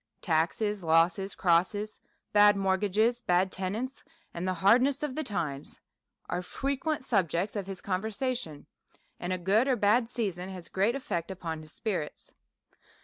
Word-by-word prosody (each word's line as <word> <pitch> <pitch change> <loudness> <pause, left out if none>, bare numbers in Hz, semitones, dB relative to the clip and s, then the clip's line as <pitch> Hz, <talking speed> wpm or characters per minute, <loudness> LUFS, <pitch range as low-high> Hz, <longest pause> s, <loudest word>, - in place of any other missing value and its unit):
Taxes, 185 +4 0
losses, 170 +4 +2
crosses, 190 +5 +1 0.3
bad 205 0 +7
mortgag 195 +1 0
es, 235 +2 +3
bad 185 -2 +2
tenants, 215 +8 -4 0.3
and 175 +2 -3
the 185 - 0
hardness 260 +7 +5
of 295 -3 -1
the 310 - -2
times, 160 - -4 0.5
are 175 - -2
frequent 275 - -2
subjects 190 - 0
of 200 -2 -3
his 195 -2 -6
conversation; 210 - -3 0.5
and 175 - -3
a 185 - +1
good 200 +8 +2
or 270 - +3
a - - 0
bad 225 +3 +3
sea, 230 -5 -1
son 180 +2 -7
has 185 -3 -8
a - - -14
great 200 +6 +2
effect 170 -11 -3
upon 165 -4 -5
his 155 -1 -12
spirits. 185 -8 -4
195 Hz, 160 wpm, -29 LUFS, 175-230 Hz, 0.5 s, bad